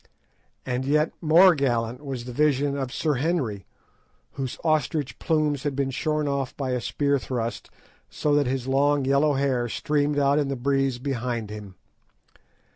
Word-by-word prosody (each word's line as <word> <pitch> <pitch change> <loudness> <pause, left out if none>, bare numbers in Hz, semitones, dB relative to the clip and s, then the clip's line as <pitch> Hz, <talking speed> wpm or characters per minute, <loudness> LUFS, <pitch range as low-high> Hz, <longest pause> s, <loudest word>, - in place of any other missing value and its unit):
And 125 0 -2
yet 150 +3 +2
more 175 +3 +7
gallant 125 -3 -1
was 130 -4 -5
the 125 - -6
vision 145 +1 +1
of 135 -3 -3
Sir 150 0 0
Henry, 135 - -1 0.6
whose 135 -3 -5
ostrich 155 -3 0
plumes 150 -3 +1
had 145 -2 -2
been 135 -1 -1
shorn 150 +2 -1
off 140 -2 -2
by 135 -2 -2
a 125 -1 -1
spear 140 +3 0
thrust, 120 -2 -4 0.4
so 150 - -1
that 145 -2 +3
his 130 -1 -2
long 140 +1 +2
yellow 140 +2 +3
hair 135 -3 0
streamed 145 +4 0
out 140 +1 +3
in 145 - 0
the 135 - -2
breeze 135 0 0
behind 120 -4 -3
him. 105 -3 -9
140 Hz, 160 wpm, -25 LUFS, 125-145 Hz, 0.6 s, more